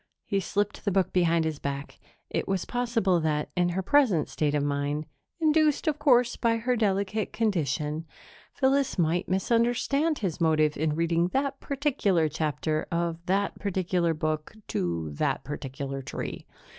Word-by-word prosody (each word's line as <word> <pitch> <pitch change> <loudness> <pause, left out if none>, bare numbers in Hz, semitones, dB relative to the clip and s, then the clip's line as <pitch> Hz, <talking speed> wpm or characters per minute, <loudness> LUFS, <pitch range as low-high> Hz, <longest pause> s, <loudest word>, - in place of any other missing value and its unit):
He 200 - 0
slipped 205 +2 -2
the 205 - +1
book 190 -1 +1
behind 170 -2 +3
his 155 -2 -2
back; 140 0 -5 0.3
it - - -1
was 195 -2 -1
possible 230 -7 +1
that, 155 -2 -1
in 175 -1 +2
her 185 +2 -2
present 210 - +3
state 150 -1 0
of 145 - +1
mind 145 +1 -1 0.3
induced, 310 -1 +3
of 305 -1 +1
course, 250 -4 +4
by 230 -1 +1
her 245 +2 0
delicate 205 -1 0
condition 160 - -1 0.5
Phyllis 270 -2 +2
might 175 +1 +1
misunderstand 240 - +1
his 185 -4 -3
motive 155 -2 +3
in 155 0 0
reading 170 +1 +2
that 275 0 0
particular 255 - +1
chapter 155 0 -1
of 170 0 -1
that 195 +2 0
particular 180 -4 0
book 155 +4 -2
to 85 -3 -2
that 75 - -1
particular 135 -1 -5
tree. - - -6
180 Hz, 150 wpm, -27 LUFS, 155-230 Hz, 0.5 s, course